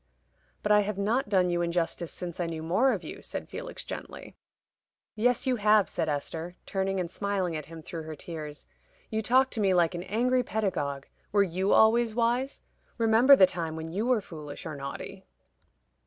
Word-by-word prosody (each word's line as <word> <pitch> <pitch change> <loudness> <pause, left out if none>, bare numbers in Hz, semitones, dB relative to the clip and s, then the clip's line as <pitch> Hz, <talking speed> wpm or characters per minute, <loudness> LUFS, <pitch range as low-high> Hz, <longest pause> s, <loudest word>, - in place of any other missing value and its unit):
"But 210 - +1
I 210 - +7
have 205 -1 -1
not 215 +4 0
done 185 -3 +3
you 175 0 0
injustice 170 0 -1
since 175 -1 -7
I 175 - 0
knew 160 -1 -5
more 205 +11 +3
of - - -2
you," - - -8
said - - -6
Felix, - - -7
gently. - - -8 0.8
"Yes, 245 +5 +2
you 255 -2 +1
have," 210 -1 +4
said 160 - -1
Esther, 160 +4 -4
turning 195 0 -1
and 175 -2 -3
smiling 195 -4 -1
at 155 -2 -5
him 165 0 -10
through 165 +1 -6
her 155 0 -6
tears. 150 -1 -8 0.5
"You 220 0 0
talk 260 +4 +3
to 225 - -2
me 190 -2 +3
like 175 -1 +3
an 175 - -4
angry 245 +7 +1
pedagogue. 165 - -2 0.3
Were 200 -1 +4
you 190 +2 -1
always 225 0 +4
wise? 245 +3 0 0.4
Remember 230 +4 +6
the 190 - +7
time 170 -3 -3
when 160 0 -6
you 210 +7 -1
were 250 -4 +3
foolish 155 -6 -8
or 160 -2 -5
naughty." 140 0 -7
190 Hz, 185 wpm, -28 LUFS, 165-220 Hz, 0.8 s, I